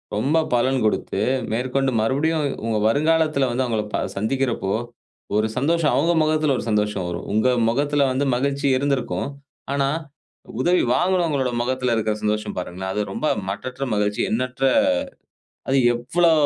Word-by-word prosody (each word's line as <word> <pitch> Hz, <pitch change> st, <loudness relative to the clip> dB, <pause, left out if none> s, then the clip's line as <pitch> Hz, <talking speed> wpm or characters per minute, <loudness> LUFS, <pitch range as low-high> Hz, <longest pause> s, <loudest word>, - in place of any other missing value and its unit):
ரொம்ப 135 Hz, +10 st, +1 dB, 0.2 s
பலன் 130 Hz, +2 st, +2 dB
குடுத்து 105 Hz, -2 st, 0 dB, 0.3 s
மேற்கொண்டு 130 Hz, +3 st, 0 dB
மறுபடியும் 150 Hz, +7 st, +1 dB, 0.2 s
உங்க 115 Hz, -1 st, 0 dB
வருங்காலத்துல 155 Hz, 0 st, +2 dB
வந்து 125 Hz, +2 st, 0 dB
அவுங்கள 110 Hz, -3 st, -1 dB
ப -, -, +1 dB, 0.2 s
சந்திக்கிறப்போ, 115 Hz, -3 st, -1 dB, 0.6 s
ஒரு 110 Hz, +1 st, +2 dB
சந்தோஷம் 165 Hz, +2 st, +2 dB
அவுங்க 165 Hz, +5 st, +2 dB
முகத்துல 155 Hz, -3 st, +2 dB
ஒரு -, -, -4 dB
சந்தோஷம் 105 Hz, -3 st, 0 dB
வரும். 85 Hz, 0 st, -5 dB
உங்க 110 Hz, +4 st, +3 dB, 0.2 s
மொகத்ல 145 Hz, +2 st, +1 dB
வந்து 135 Hz, +2 st, 0 dB
மகிழ்ச்சி 140 Hz, +2 st, -1 dB
இருந்திருக்கும். 140 Hz, -1 st, -1 dB, 0.4 s
ஆனா 140 Hz, -1 st, +1 dB, 0.7 s
உதவி 180 Hz, +3 st, +3 dB
வாங்குனவங்களோட 170 Hz, -8 st, +1 dB
மொகத்துல 125 Hz, -1 st, 0 dB
இருக்குற 110 Hz, -1 st, 0 dB
சந்தோஷம் 105 Hz, 0 st, -1 dB
பாருங்களேன். 95 Hz, +1 st, -4 dB
அது 105 Hz, -, 0 dB
ரொம்ப 155 Hz, -, -2 dB, 0.2 s
மட்டற்ற 125 Hz, +7 st, -5 dB
மகிழ்ச்சி, 105 Hz, 0 st, 0 dB
எண்ணற்ற 125 Hz, +3 st, -2 dB, 1.1 s
அது 135 Hz, -, +3 dB, 0.2 s
எவ்வளோ 165 Hz, +8 st, +2 dB
130 Hz, 135 wpm, -22 LUFS, 110-145 Hz, 1.1 s, உங்க